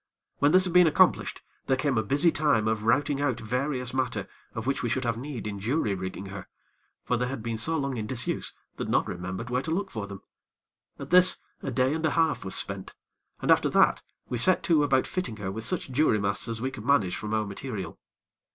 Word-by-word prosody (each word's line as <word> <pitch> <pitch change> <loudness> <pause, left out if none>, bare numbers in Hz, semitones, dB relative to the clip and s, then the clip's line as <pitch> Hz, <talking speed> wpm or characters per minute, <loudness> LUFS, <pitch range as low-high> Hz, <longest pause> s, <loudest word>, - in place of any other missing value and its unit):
When 145 +1 +4
this 185 +2 +6
had 180 -2 0
been 180 -1 +7
accomplished, 155 - +2 0.2
there 130 - +2
came 135 0 0
a 110 - +3
busy 140 +10 +3
time 145 -9 +2
of 110 -1 -1
routing 140 +4 +2
out 130 -5 0
various 125 +2 -2
matter 130 -2 -1 0.3
of 110 - -4
which 140 +1 0
we 120 - -1
should 130 +4 0
have 115 -1 0
need 125 -1 -6
in 100 -1 -4
jury 110 0 0
rigging 95 +1 -5
her; 95 -1 -8 0.6
for 125 - 0
they 125 +1 -1
had 125 -3 -5
been 115 -1 -3
so 160 +8 +1
long 140 -3 -2
in 110 -1 -3
disuse, 125 +1 -2 0.3
that - - -4
none - - +2
remembered 95 +7 -5
where 125 +1 +1
to 160 - -6
look 195 +4 -1
for 105 -3 -5
them. 100 -1 -9 0.7
At - - -9
this 180 0 +7 0.2
a - - -3
day 130 +2 +1
and 160 0 -3
a 160 - +3
half 165 0 +1
was 95 0 -4
spent, 100 -1 -4 0.5
and - - +3
after - - +4
that - - +4 0.3
we 120 - -3
set 185 +9 +3
to 160 -3 +3
about 135 -2 +2
fitting 180 -13 -3
her 95 -2 -4
with 110 +3 -4
such 180 -7 -2
jury 130 -5 +3
masts 100 +2 -1
as 115 -1 -3
we 130 +3 -2
could 105 - -8
manage 110 -9 +2
from 110 +1 -3
our 110 -1 0
material. 100 -3 -6
125 Hz, 225 wpm, -27 LUFS, 105-145 Hz, 0.7 s, been